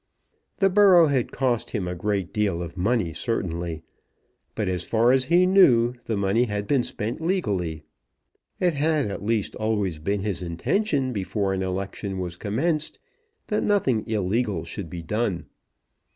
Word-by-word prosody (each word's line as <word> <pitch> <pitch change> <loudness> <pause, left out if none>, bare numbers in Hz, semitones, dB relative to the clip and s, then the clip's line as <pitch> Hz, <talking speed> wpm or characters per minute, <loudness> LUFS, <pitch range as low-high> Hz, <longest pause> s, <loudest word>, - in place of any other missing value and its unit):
The 195 -2 +3
borough 185 -5 +6
had 130 -4 0
cost 125 -4 0
him 100 -6 -3
a 90 - -2
great 95 0 -2
deal 100 -6 0
of 85 0 -8
money 95 -2 0
certainly; 85 - -3 0.7
but 105 -3 -1
as 90 -2 -1
far 115 +6 +2
as 130 0 +3
he 175 +5 +4
knew 125 -11 +5
the 110 - -1
money 100 +5 +2
had 105 -2 -3
been 135 +3 +2
spent 110 +6 -4
legally. 100 - -1 0.8
It 180 -2 +2
had 150 -5 +1
at 100 - -5
least 110 -1 0
always 105 -7 -1
been 100 +5 -1
his 100 -5 -2
intention 130 - 0
before 100 -1 -1
an 95 - -2
election 95 +1 -4
was 90 -2 -4
commenced 150 - -1 0.5
that 210 - -1
nothing 135 - +2
illegal 105 -3 0
should 85 +1 -7
be 85 0 -7
done. 105 0 -1
105 Hz, 155 wpm, -25 LUFS, 95-130 Hz, 0.8 s, borough